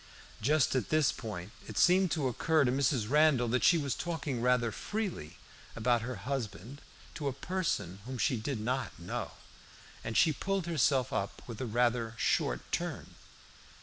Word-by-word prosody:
Just 140 +2 +3
at 120 -7 0
this 155 -3 +3
point 105 -4 -6 0.2
it - - -7
seemed 185 +1 +5
to 155 -5 0
occur 155 +4 +2
to 125 - +2
Mrs. 130 -4 +1
Randall 150 -2 +4
that 125 +1 +1
she 170 - +6
was 140 -5 -1
talking 155 -8 -3
rather 125 -2 +2
freely 200 - -4 0.4
about 120 +1 +2
her 125 +2 -4
husband 130 0 -4 0.3
to 150 -3 -4
a - - +1
person 145 - -2
whom 130 0 -4
she 130 +2 +2
did 115 +2 -3
not 120 -3 -2
know, 85 +1 -5 0.7
and 115 - -2
she 160 -3 +5
pulled 195 +5 -2
herself 140 -6 +2
up 100 -2 -3
with 115 -1 -7
a 130 - -2
rather 120 0 +1
short - - +1
turn. - - -3
130 Hz, 165 wpm, -31 LUFS, 115-155 Hz, 0.7 s, she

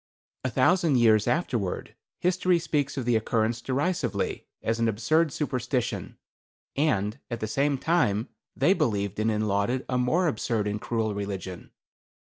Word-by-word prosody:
"A 130 - 0
thousand 155 +5 +3
years 110 -3 +4
afterward 120 - -1 0.2
history 180 0 +2
speaks 145 -4 -1
of 130 - -2
the 120 -1 +2
occurrence 110 +1 0
derisively, 145 +9 -1 0.2
as 115 +1 0
an 115 - +2
absurd 130 +9 +2
superstition, 135 -6 -2 0.6
and 110 -8 +1
at 120 -2 -4
the 110 - -2
same 140 +6 +1
time 130 -8 +1 0.3
they 190 - +4
believed 105 - -1
in 110 +1 +2
and 110 0 0
lauded 100 +6 0
a 125 -1 0
more 160 +9 +2
absurd 110 -6 0
and 105 0 -2
cruel 110 -2 -1
religion. 95 -3 -5
120 Hz, 145 wpm, -27 LUFS, 105-145 Hz, 0.6 s, years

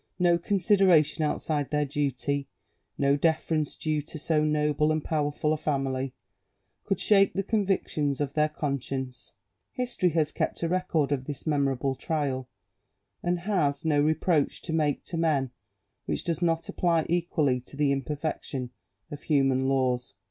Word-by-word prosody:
No 175 -1 +3
consideration 180 -5 +3
outside 150 -1 -1
their 150 -1 +1
duty, 140 0 -1 0.5
no 140 0 +3
deference 160 0 0
due 155 -1 -1
to 155 +2 -9
so 155 0 +1
noble 150 0 +2
and 155 -1 0
powerful 150 0 0
a - - -1
family, 135 -3 -2 0.7
could 195 - 0
shake 195 -2 +4
the 195 - -1
convictions 190 - 0
of 145 -2 -2
their 150 0 +2
conscience. 135 -3 -4 0.4
History 245 -8 0
has 155 -2 +1
kept - - -2
a - - +2
record 165 -5 0
of 130 -2 -1
this 145 -1 -6
memorable 140 -3 +1
trial; 135 -3 -2 0.7
and 175 0 -1
has, 165 -8 0
no 150 -2 +3
reproach 155 0 +1
to 165 - -4
make 150 -3 +1
to 170 - -5
men 145 -6 +1 0.6
which - - -1
does 170 0 -2
not 165 -1 +1
apply 170 -3 +1
equally 160 -6 +1
to 125 +3 -14
the 145 -1 +2
imperfection 140 -2 -3 0.4
of 145 -1 -7
human 135 -3 +2
laws. 125 -5 0
150 Hz, 150 wpm, -27 LUFS, 140-165 Hz, 0.7 s, shake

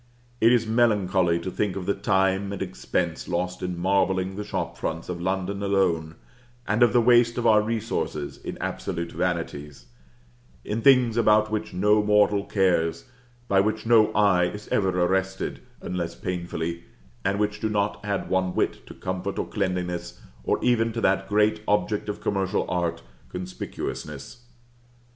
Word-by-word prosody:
It 115 +1 +6
is 120 -2 +3
melancholy 100 -7 +2
to 95 - -4
think 100 -1 -1
of 95 -2 -4
the 100 - +1
time 95 0 +1
and 100 - -5
expense 85 -3 -3
lost 90 +1 -2
in 90 -1 -3
marbling 95 +1 +1
the 105 - -4
shop 105 - -4
fronts 80 +2 -4
of 85 -1 -4
London 95 +2 -2
alone, 90 -5 +1 0.5
and 105 +3 +1
of 120 - +6
the 120 - +4
waste 120 0 +4
of 120 - -1
our 110 -2 +6
resources 110 -9 -3
in - - -7
absolute 85 0 -4
vanities, 80 -6 -3 0.8
in 110 +2 -2
things 125 -3 +5
about 110 -2 +4
which 110 0 -2
no 105 +3 +3
mortal 105 -1 +3
cares, 90 -4 +1 0.4
by 95 - +3
which 110 +2 -1
no 110 -2 +5
eye 100 -4 +4
is 105 +4 -6
ever 95 -2 +2
arrested, 95 +1 0 0.2
unless 90 -2 -3
painfully, 85 -2 -4 0.4
and 100 +1 0
which 105 0 -1
do 110 - -1
not 105 -1 0
add 100 -1 -2
one 95 -1 0
whit - - -1
to - - -10
comfort 95 +1 -4
or - - -1
cleanliness, 90 -2 -3 0.2
or - - +1
even 115 -2 +2
to 115 - -3
that 95 -1 +1
great 105 +1 +2
object 105 0 0
of 105 - -4
commercial 95 0 0
art 85 -6 -2 0.3
conspicuousness. 90 - -6
95 Hz, 155 wpm, -25 LUFS, 90-105 Hz, 0.8 s, It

